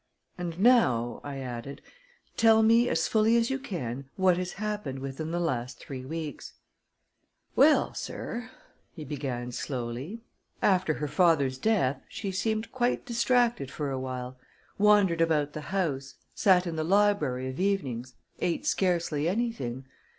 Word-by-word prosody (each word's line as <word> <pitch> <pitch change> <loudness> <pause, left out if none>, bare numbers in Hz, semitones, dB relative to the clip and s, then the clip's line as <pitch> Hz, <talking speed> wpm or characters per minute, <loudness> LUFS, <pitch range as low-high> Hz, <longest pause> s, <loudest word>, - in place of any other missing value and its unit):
"And 175 -2 -5
now," 130 - +3
I 140 -1 -6
added, 130 +1 -6 0.6
"tell 225 -1 +5
me, 230 +2 +5
as 165 - +1
fully 220 +1 +3
as 235 +2 +1
you 270 - -1
can, 140 - -5
what 190 -2 +4
has 180 0 -3
happened 210 -9 -4
within 135 +4 -5
the 170 +1 -1
last 125 -7 -2
three 130 -2 -7
weeks." 155 +1 -6 1.0
"Well, 300 +3 +5
sir," 245 +2 -5 0.5
he 155 -4 -7
began 130 -4 -4
slowly, 130 - -5 0.4
"after 185 -5 +2
her 150 - -3
father's 145 -6 +2
death, 140 -11 +1
she 195 - -4
seemed 220 +3 -1
quite 250 -1 0
distracted 240 - +1
for 145 0 -3
a 135 - -2
while 130 0 -5 0.4
wandered 200 -5 +4
about 150 -3 +2
the 155 - -5
house, 150 -8 -2 0.2
sat 185 -2 +4
in 165 -2 -4
the 155 - 0
library 165 -9 +2
of 130 +1 -6
evenings, 130 - -1 0.2
ate 180 - -1
scarcely 170 - +1
anything. 190 - -2
165 Hz, 145 wpm, -28 LUFS, 135-210 Hz, 1.0 s, tell